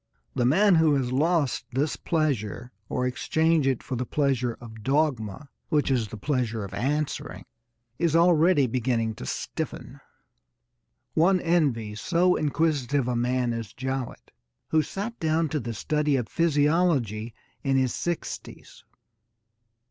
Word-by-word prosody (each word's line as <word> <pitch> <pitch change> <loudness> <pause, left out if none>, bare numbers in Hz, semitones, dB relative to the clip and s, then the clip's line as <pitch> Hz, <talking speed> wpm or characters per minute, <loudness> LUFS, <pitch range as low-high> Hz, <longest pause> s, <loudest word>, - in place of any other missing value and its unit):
The 120 - +1
man 195 +9 +5
who 160 -3 +4
has 130 -3 -1
lost 150 0 +1
this 140 +4 0
pleasure 125 - -1 0.2
or 125 - -1
exchanged 160 +4 +1
it 130 -3 0
for 130 - -4
the 125 - -1
pleasure 130 -3 0
of 110 -2 -11
dogma, 135 -1 -1 0.2
which 150 -3 +1
is 120 -4 +1
the 110 - -8
pleasure 115 -3 -1
of 100 - -8
answering, 145 +4 -2 0.5
is 170 -2 +2
already 170 -3 +5
beginning 115 -2 0
to 65 - -8
stiffen. - - -5 1.1
One 180 +4 +4
envies 130 -12 0
so 180 +1 +3
inquisitive 145 -4 0
a 125 - 0
man 120 0 0
as 115 -3 -5
Jowett, 130 0 -5 0.4
who 160 - +3
sat 205 +9 -5
down 160 0 +1
to 150 - -1
the 120 -2 -4
study 150 +5 0
of 125 -4 -1
physiology 145 - +1 0.3
in 135 -1 +2
his 130 -2 +1
sixties. 175 -1 -5
140 Hz, 135 wpm, -26 LUFS, 120-160 Hz, 1.1 s, man